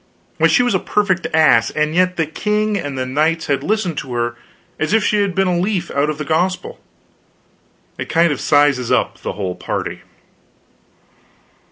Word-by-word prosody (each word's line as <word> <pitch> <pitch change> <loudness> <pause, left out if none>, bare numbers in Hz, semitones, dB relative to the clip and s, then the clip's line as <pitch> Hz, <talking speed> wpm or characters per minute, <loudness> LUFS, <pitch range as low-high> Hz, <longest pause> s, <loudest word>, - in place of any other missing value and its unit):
Why, - - +5
she 250 - +3
was 245 - +1
a 190 - +2
perfect 190 -3 0
ass; 145 -8 +4
and 150 0 -1
yet 180 +1 +2
the 165 - +1
king 210 +6 -1
and 145 -8 -4
his 130 - -2
knights 155 +5 0
had 140 -1 0
listened 200 -7 -1
to 130 - -7
her 120 0 -1 0.4
as 155 +6 -1
if 225 - +2
she 210 -1 +2
had 195 -3 -1
been 195 0 +2
a 175 -1 +1
leaf 185 0 -1
out 140 +2 +1
of 155 - -3
the 150 - -5
gospel. 180 +5 -1 1.2
It - - -5
kind 165 0 +3
of 145 - -3
sizes 145 -4 +2
up - - 0
the - - -4
whole 95 -2 -3
party. - - -4
165 Hz, 185 wpm, -18 LUFS, 145-190 Hz, 1.2 s, Why